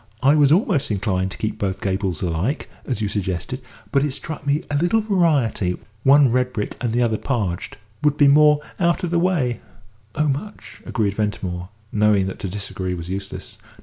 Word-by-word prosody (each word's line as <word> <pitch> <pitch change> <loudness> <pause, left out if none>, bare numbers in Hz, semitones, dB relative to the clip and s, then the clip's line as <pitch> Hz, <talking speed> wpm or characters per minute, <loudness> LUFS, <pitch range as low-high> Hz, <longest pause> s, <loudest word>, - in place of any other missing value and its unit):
I 140 +2 +6
was 145 -2 +5
almost 160 -5 +2
inclined 95 -2 0
to - - -9
keep 110 - -3
both 95 -1 -1
gables 95 -4 -1
alike, 90 - -1 0.2
as 115 -5 -1
you - - +1
suggested, 100 +6 -3 0.3
but 140 -1 +3
it 145 -3 -1
struck 145 0 -7
me 145 +3 +1
a - - 0
little 175 +8 +3
variety 155 - +1 0.2
one 135 0 +6
red 125 +1 +1
brick 105 - -3
and 120 -2 0
the 120 +2 +2
other 110 -2 0
'parged' 105 -9 -2 0.3
would 150 -1 +3
be 145 - +6
more 150 +1 +6 0.2
out 170 +1 +2
of 175 - -1
the 170 - +3
way." 165 -10 +1 0.6
"Oh, 150 0 +1
much," 170 +10 -5
agreed 105 -4 0
Ventimore, 95 -4 -3 0.2
knowing 105 -2 +3
that 95 - -5
to 95 - -3
disagree 95 -1 -4
was 85 0 -7
useless. 100 +1 -6
120 Hz, 185 wpm, -22 LUFS, 95-145 Hz, 0.6 s, I